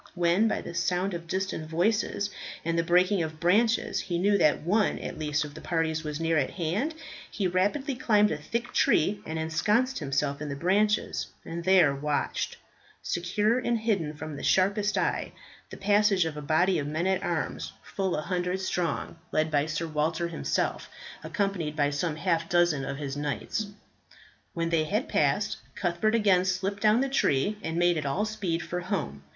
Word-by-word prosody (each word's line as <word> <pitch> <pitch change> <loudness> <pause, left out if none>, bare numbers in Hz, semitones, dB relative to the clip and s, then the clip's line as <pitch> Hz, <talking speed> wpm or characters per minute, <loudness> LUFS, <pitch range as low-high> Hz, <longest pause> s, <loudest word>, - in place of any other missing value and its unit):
When 175 +5 +3
by - - -1
the 170 - -7
sound 180 +3 0
of 170 -1 -6
distant 185 -4 -3
voices 205 +3 0 0.3
and 165 0 0
the 165 - +3
breaking 180 +3 +3
of 160 -1 -4
branches 220 +7 +2
he 175 -3 -2
knew 200 +4 +3
that 155 -3 +3
one 205 +5 +2
at - - -6
least 150 -1 0
of 145 - -9
the 155 - -10
parties 160 -1 -1
was 150 0 -4
near 165 -1 +2
at 135 - 0
hand, 195 - -2 0.3
he 200 - -2
rapidly 205 - 0
climbed 210 -4 +3
a 155 - -1
thick 235 +10 -4
tree 200 +6 +3
and 160 - -3
ensconced 210 +11 +1
himself 140 -1 -1
in 150 - -4
the 140 - -3
branches, 200 +7 +1 0.2
and 170 +1 -5
there 185 -7 +5
watched, 145 +1 -2 0.5
secure 210 +7 +1
and 240 -2 0
hidden 190 -9 0
from 155 0 -6
the - - -7
sharpest 200 +2 +2
eye, - - -1 0.4
the - - -9
passage 205 -2 +3
of 160 -2 -3
a 150 - -5
body 160 +4 +2
of 145 - -3
men 155 +4 -1
at 190 0 +1
arms - - -2
fully 190 -4 -2
a - - -1
hundred 180 +1 -1
strong, 180 -3 -2
led 155 0 +1
by 145 0 +2
Sir 155 +1 -2
Walter 160 +2 -1
himself, 165 - -2 0.3
accompanied 195 -8 -2
by 145 -1 +2
some 150 +2 -1
half 165 0 0
dozen 175 -5 +3
of 135 0 -4
his 140 -2 -4
knights. 145 +8 -2 0.9
When 165 0 -1
they 165 -2 +2
had 215 - -1
passed, - - +1 0.2
Cuthbert 185 +5 +1
again 195 -5 +4
slipped 190 +2 -1
down 215 +3 +4
the 275 - +1
tree 205 - +1
and 160 -2 -3
made 175 -1 +3
at 150 - -5
all 190 +10 0
speed 195 -6 -2
for 180 - -3
home. 180 - -3
175 Hz, 185 wpm, -28 LUFS, 155-200 Hz, 0.9 s, there